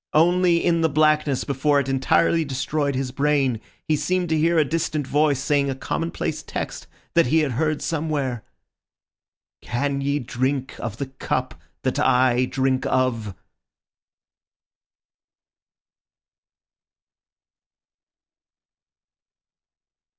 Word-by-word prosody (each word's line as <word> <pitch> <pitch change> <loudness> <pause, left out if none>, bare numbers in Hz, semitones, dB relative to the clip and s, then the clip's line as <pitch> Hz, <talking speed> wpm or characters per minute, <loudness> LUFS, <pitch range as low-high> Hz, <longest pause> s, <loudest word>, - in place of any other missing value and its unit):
Only 175 +1 +3
in 170 -1 +2
the 160 - +3
blackness 155 -2 +2
before 140 +1 +1
it 140 - -2
entirely 135 +5 +2
destroyed 140 0 -2
his 130 -1 -2
brain 135 -4 +1 0.2
he 155 - +1
seemed 180 +2 -1
to 160 - +2
hear 165 +2 +2
a 155 - +4
distant 155 -1 -1
voice 145 0 +2
saying 140 0 +1
a 135 - -2
commonplace 165 +5 -3
text - - -6 0.3
that 170 -6 +4
he 160 +5 +3
had 150 -3 0
heard 155 +4 -1
somewhere, 145 -7 -2 1.2
"Can 140 +3 -2
ye 140 +1 0
drink 130 +1 -2
of 110 -2 -5
the 140 - -3
cup 135 0 -3 0.3
that - - -1
I 125 0 +3
drink 130 0 0
of?" 115 -6 0
140 Hz, 105 wpm, -23 LUFS, 130-155 Hz, 1.2 s, a